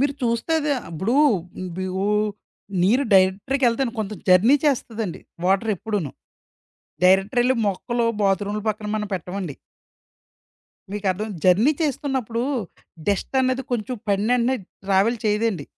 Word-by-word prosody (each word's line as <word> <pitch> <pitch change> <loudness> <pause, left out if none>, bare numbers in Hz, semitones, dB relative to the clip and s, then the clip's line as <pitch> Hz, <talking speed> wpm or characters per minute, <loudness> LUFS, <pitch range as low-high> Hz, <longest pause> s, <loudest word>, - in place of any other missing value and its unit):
మీరు 280 +1 +1
చూస్తే 235 +6 0
అది 295 -1 0 0.2
ఇప్పుడూ 190 +9 -1 0.6
బి 185 0 -3
వూ 195 +1 0 0.8
నీరు 240 +10 +3
డైరెక్టర్‌కెళ్తండి 230 +6 +2
కొంచెం 215 -1 -3
జర్నీ 195 +10 +6
చేస్తాదండి 230 - -1 0.2
వాటర్ 195 +4 +2
ఎప్పుడూను. 200 -7 -3 0.9
డైరెక్టరెళ్లి 210 +8 +4
మొక్కలు 235 +5 -1 0.2
బాత్రూమ్‌ల 200 +1 0
పక్కన 210 0 -3
మనం 210 -1 -2
పెట్టమండి. 180 -3 -5 1.4
మీకర్థమై 205 +1 -2
జర్నీ 200 +11 +5
చేస్తున్నప్పుడు 265 -5 -1 0.6
డస్ట్ 205 +5 -1
అనేది 255 0 +1
కొంచెం 245 +1 -2
పడినెంటనే 235 +6 +2 0.3
ట్రావెల్ 200 +5 +2
చేయదండి. 210 -7 0
215 Hz, 105 wpm, -23 LUFS, 195-245 Hz, 1.4 s, జర్నీ